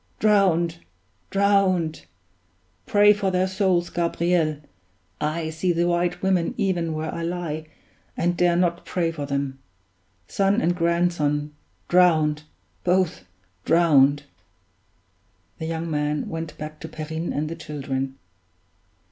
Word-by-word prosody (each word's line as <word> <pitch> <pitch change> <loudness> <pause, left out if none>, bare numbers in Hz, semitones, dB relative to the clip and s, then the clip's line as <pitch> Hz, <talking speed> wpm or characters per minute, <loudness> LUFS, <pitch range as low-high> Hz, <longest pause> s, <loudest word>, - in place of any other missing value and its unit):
Drowned! 180 -6 +2 0.5
drowned! 190 - +1 0.8
Pray 205 0 +6
for 200 -2 -1
their 185 0 +1
souls, 185 -2 0
Gabriel 170 -2 +1 0.6
I 160 +1 -1
see 165 +3 0
the 170 0 +1
White 175 +1 0
Women 185 -3 +1
even 175 -4 0
where 155 0 -3
I 170 - -4
lie, 165 -2 -4 0.5
and 175 +1 +1
dare 175 0 +3
not 175 -1 +1
pray 170 -2 -1
for 145 -3 -5
them. 140 -1 -2 0.7
Son 200 +2 +2
and 175 -5 +1
grandson 170 -4 0 0.3
drowned! 155 -4 +3 0.4
both 180 - +1 0.4
drowned!" 145 -4 +4 1.4
The 160 - -4
young 165 0 -3
man 150 0 -1
went 165 -1 -5
back 155 0 -7
to 160 - -8
Perrine 160 +2 -4
and 150 +2 -2
the 165 - -5
children. 135 -4 -4
170 Hz, 120 wpm, -24 LUFS, 155-180 Hz, 1.4 s, Pray